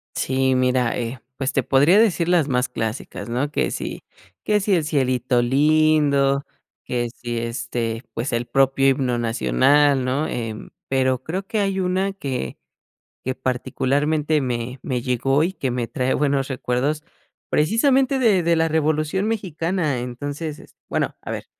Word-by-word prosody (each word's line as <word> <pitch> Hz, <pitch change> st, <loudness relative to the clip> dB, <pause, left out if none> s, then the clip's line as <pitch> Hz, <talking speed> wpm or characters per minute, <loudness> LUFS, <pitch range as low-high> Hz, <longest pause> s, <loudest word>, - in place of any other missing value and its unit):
Sí, 130 Hz, 0 st, +1 dB
mira, 125 Hz, -1 st, +1 dB
eh, 120 Hz, +1 st, -4 dB, 0.2 s
pues, 135 Hz, -1 st, -1 dB
te 135 Hz, -, +1 dB
podría 145 Hz, -, +4 dB
decir 180 Hz, -7 st, +2 dB
las 175 Hz, -4 st, +3 dB
más 125 Hz, 0 st, +1 dB
clásicas, 110 Hz, -2 st, -5 dB
¿no? 125 Hz, +5 st, -1 dB
Que -, -, -1 dB
si, -, -, -5 dB, 0.4 s
que 210 Hz, -1 st, +2 dB
si 200 Hz, 0 st, +1 dB
el 165 Hz, -, +1 dB
Cielito 130 Hz, -4 st, +1 dB
Lindo, 140 Hz, 0 st, +3 dB, 0.4 s
que 120 Hz, -1 st, -2 dB
si, 120 Hz, -1 st, -5 dB
este, 115 Hz, 0 st, -3 dB
pues, 120 Hz, +3 st, -3 dB
el 120 Hz, +1 st, 0 dB
propio 135 Hz, +2 st, +3 dB
himno 130 Hz, -3 st, +1 dB
nacional, 120 Hz, -, +3 dB
¿no?, 135 Hz, +5 st, 0 dB
em, 115 Hz, -2 st, -5 dB, 0.2 s
pero 130 Hz, -1 st, +1 dB
creo 190 Hz, +4 st, -4 dB
que 220 Hz, -, -1 dB
hay 195 Hz, -1 st, 0 dB
una 185 Hz, +1 st, 0 dB
que, 135 Hz, -, -4 dB, 0.7 s
que 130 Hz, +1 st, -2 dB
particularmente 145 Hz, +4 st, 0 dB
me 125 Hz, 0 st, -3 dB
me 125 Hz, -3 st, -2 dB
llegó, 135 Hz, +4 st, +1 dB
y 180 Hz, +3 st, -1 dB
que 135 Hz, -9 st, -2 dB
me 120 Hz, -1 st, -2 dB
trae 130 Hz, 0 st, -1 dB
buenos 140 Hz, -1 st, 0 dB
recuerdos, 130 Hz, +4 st, -1 dB, 0.5 s
precisamente 260 Hz, -, +2 dB
de 205 Hz, -7 st, +3 dB
de 170 Hz, 0 st, +3 dB
la 165 Hz, -, +2 dB
Revolución 155 Hz, +4 st, 0 dB
Mexicana. 170 Hz, -, -1 dB
Entonces 145 Hz, +5 st, -5 dB
es -, -, -17 dB
bueno, -, -, -1 dB
a -, -, -6 dB
ver, -, -, -5 dB
135 Hz, 155 wpm, -22 LUFS, 125-155 Hz, 0.7 s, podría